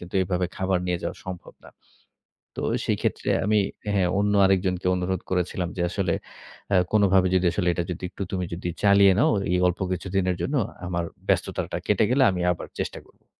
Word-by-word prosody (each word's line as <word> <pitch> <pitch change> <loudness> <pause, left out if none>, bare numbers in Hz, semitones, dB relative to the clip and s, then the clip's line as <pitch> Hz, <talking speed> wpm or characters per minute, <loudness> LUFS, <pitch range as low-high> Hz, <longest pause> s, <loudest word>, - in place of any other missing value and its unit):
কিন্তু 90 +1 -11
এভাবে 90 0 -1
খাবার 95 -1 +1
নিয়ে 90 -1 0
যাওয়া - - -4
সম্ভব 95 -2 -8
না। - - -13 0.9
তো - - -4 0.2
সেই - - 0
ক্ষেত্রে - - -1 0.2
আমি 105 0 +3 0.3
হ্যাঁ, 105 -1 -2
হ্যাঁ 90 -2 +2
অন্য 105 0 +2
আরেকজনকে 95 -1 +1
অনুরোধ 90 0 -2
করেছিলাম 90 -1 -1
যে 90 - -1
আসলে 90 -2 -1 0.6
অ্যা 100 - +3
"কোনোভাবে 95 -3 +4
যদি 90 0 +2
আসলে 90 -3 -1
এটা 85 - -1
যদি 90 - -7
একটু 100 - -6
তুমি 90 -2 -1
যদি 90 +1 -4
চালিয়ে 100 -1 +6
নাও, - - +4 0.2
এই 90 - +3
অল্প 90 -1 -1
কিছুদিনের 90 0 -1
জন্য, 140 - -1 0.3
আমার 85 -1 -1 0.2
ব্যস্ততাটা - - -1
কেটে - - +3
গেলে 130 +1 +4
আমি 90 - -3
আবার 85 - -5
চেষ্টা - - -4
করব।" - - -28
95 Hz, 190 wpm, -25 LUFS, 90-100 Hz, 0.9 s, চালিয়ে